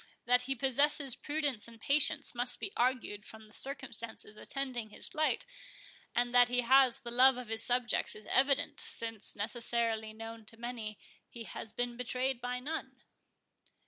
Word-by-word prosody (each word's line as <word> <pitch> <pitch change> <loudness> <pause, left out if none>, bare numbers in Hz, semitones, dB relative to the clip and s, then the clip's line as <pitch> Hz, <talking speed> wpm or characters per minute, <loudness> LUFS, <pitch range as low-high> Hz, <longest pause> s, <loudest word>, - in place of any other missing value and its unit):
That 250 0 +4
he 270 - +2
possesses 275 +1 +2
prudence 290 -7 -2
and 230 -1 -14
patience, 290 +4 +2
must 245 0 +1
be 400 - -5
argued 240 -4 0
from 220 0 -12
the 210 - -15
circumstances 235 -6 -3
attending 250 -2 -5
his - - +2
flight; 310 0 0 0.7
and 245 0 +1
that 245 0 +6
he 245 0 +2
has 260 0 +5
the 235 - -7
love 255 +1 +6
of 250 -3 -7
his 225 -1 -1
subjects 245 0 0
is 215 - -12
evident, 275 +4 +2
since, 225 -2 +1
necessarily 225 0 +1
known 225 +1 -9
to 225 - -10
many, 230 -3 -6 0.3
he 235 - -9
has 220 - -8
been 245 -1 -3
betrayed 250 +1 -1
by 250 +1 -3
none." 305 +6 -6
245 Hz, 160 wpm, -32 LUFS, 225-265 Hz, 0.7 s, that